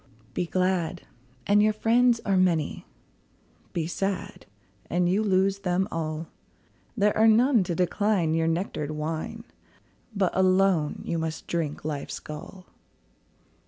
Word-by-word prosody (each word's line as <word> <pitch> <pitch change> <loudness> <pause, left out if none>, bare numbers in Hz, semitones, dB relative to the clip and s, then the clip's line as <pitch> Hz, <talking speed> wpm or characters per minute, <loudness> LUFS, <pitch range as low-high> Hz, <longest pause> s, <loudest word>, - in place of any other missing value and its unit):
Be 180 - -2
glad, 185 -1 0 0.4
and 205 +1 +4
your 215 0 +3
friends 235 +2 +3
are 195 - +2
many; 175 -5 +1 0.8
Be 165 -2 -2
sad, 195 +2 -4 0.4
and 175 0 +1
you 190 +4 +2
lose 195 -1 +2
them 185 -1 0
all; 160 0 -3 0.7
There 210 0 +3
are 220 +1 +5
none 230 0 +5
to 170 - -2
decline 180 -1 +1
your 165 0 +1
nectar'd 165 -3 -2
wine, 155 +8 -4 0.7
But 195 -2 +1
alone 185 -4 +2
you 165 - -1
must 160 -1 -4
drink 155 -4 -3
life's 150 -2 -4
gall. 180 +5 -9
185 Hz, 125 wpm, -26 LUFS, 165-200 Hz, 0.8 s, are